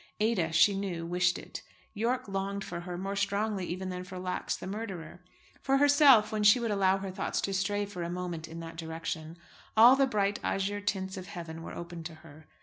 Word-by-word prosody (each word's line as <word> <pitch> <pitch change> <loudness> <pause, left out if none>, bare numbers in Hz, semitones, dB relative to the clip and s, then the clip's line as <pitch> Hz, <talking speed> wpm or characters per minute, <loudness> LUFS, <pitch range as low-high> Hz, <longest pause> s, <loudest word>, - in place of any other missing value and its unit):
Ada, 210 -7 +1
she 200 +5 +5
knew, 185 -4 -3
wished 180 +1 +1
it. - - -8 0.3
Yorke 240 +4 -1
longed 195 0 -3
for 175 - -5
her, 175 0 -6
more 195 +2 -3
strongly 200 -1 -1
even 185 +2 -4
than 180 0 -4
for 185 0 -9
Lax, 180 0 -2
the - - -8
murderer. 190 -5 -6 0.4
For 270 0 +2
herself, 280 -6 +6
when 215 -1 -1
she 210 +4 +6
would 230 -2 -1
allow 195 -1 +3
her 195 -1 -5
thoughts 185 - -2
to 195 - -2
stray 205 +2 0
for 200 -3 -7
a 170 - -3
moment 175 -2 -4
in 165 +1 -8
that 165 0 -8
direction, 160 0 -5 0.4
all 240 +4 +9
the 270 0 +3
bright 205 -4 0
azure 205 +1 -1
tints 190 -1 -2
of 185 -1 -7
heaven 165 -4 -7
were - - -8
open 170 -1 -7
to 165 -1 -6
her. 155 0 -15
190 Hz, 210 wpm, -30 LUFS, 175-205 Hz, 0.4 s, all